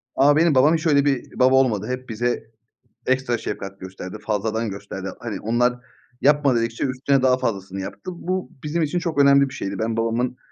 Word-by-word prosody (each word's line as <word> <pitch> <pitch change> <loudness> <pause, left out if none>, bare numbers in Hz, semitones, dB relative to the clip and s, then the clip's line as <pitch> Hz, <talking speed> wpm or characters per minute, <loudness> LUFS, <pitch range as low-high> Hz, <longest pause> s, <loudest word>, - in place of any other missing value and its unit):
Ama 145 +2 +5
benim 160 -2 +4
babam 145 +5 +5
hiç 160 0 -1
öyle 140 -2 +4
bir 135 -4 -1
baba 130 +1 +5
olmadı. 115 -5 +2
Hep 125 0 -5
bize 120 +2 -1 0.6
ekstra 130 -2 +1
şefkat 100 0 -6
gösterdi. 95 +1 -8
Fazladan 110 +1 -1
gösterdi. 95 -1 -6
Hani, 115 -3 -5
onlar 120 +2 +1 0.5
yapma, 145 -3 +4
dedikçe 115 0 -1
üstüne 135 +1 +1
daha 130 -1 +4
fazlasını 95 -6 -3
yaptı. 185 - -7
Bu, 185 +2 -3
bizim 160 +3 -1
için 160 +3 0
çok 165 -4 -3
önemli 140 0 +5
bir 135 - -10
şeydi. 100 -7 -4
Ben, 110 +1 -1
babamın 115 +2 0
125 Hz, 185 wpm, -22 LUFS, 110-140 Hz, 0.6 s, Ama